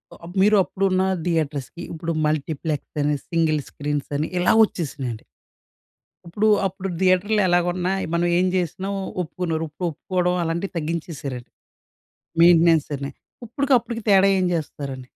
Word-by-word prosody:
ఆహ్, 170 +1 -11
మీరు 210 +2 +5
అప్పుడున్న 190 0 0 0.2
థియేటర్స్‌కి, 160 -2 -2
ఇప్పుడు 165 +1 -3
మల్టీప్లెక్స్ 155 0 -2
అని, 150 0 +1
సింగిల్ 160 -3 +1
స్క్రీన్స్ 145 0 -3
అని 155 +2 -2
ఇలా 175 - +4
వచ్చేసినాయండి... 130 - -5 1.0
ఇప్పుడు, 205 +6 0 0.2
అప్పుడు 190 +1 -4
థియేటర్‌లో 190 +3 +3
ఎలాగున్నా, 175 +1 +1 0.2
మనం 170 +1 +2
ఏం 185 - +3
చేసినా, 185 +2 -2 0.3
ఒప్పుకున్నారు. 165 -1 -3
ఇప్పుడు 175 +3 -3
ఒప్పుకోవడం 180 +3 -1
అలాంటివి 170 +4 -2
తగ్గించేసారండి. 150 -6 -5 0.9
మెయింటెనెన్స్ 165 -2 +5
అని, 140 0 -5 0.4
ఇప్పుడికి 275 +4 0
అప్పుడుకి 230 -1 -6
తేడా 195 0 +6
ఏం 185 - +1
చేస్తారండి? 140 -5 -5
170 Hz, 120 wpm, -23 LUFS, 150-185 Hz, 1.0 s, తేడా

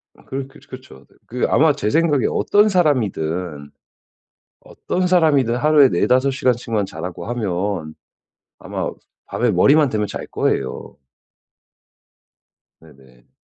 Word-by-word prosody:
아 - - -21
그러 135 0 -5
그러 135 +2 -18
그렇죠. 130 - -12
네. - - -27
그 125 +1 -2
아마 155 0 +4
제 120 -7 -2
생각에 155 -3 +2
어떤 210 +1 +2
사람이든 90 - -1 0.9
어떤 185 0 -3
사람이든 150 -9 +2
하루에 145 +1 +5
4-5 130 +2 +2
시간씩만 120 -5 -1
자라고 90 -1 -7
하면 95 -7 -3 0.6
아마 - - -4 0.4
밤에 120 -2 0
머리만 140 - +4
대면 105 -4 -2
잘 - - -6
거예요. 65 - -3 1.8
네네. 65 -2 -21
125 Hz, 245 characters per minute, -20 LUFS, 90-145 Hz, 1.8 s, 하루에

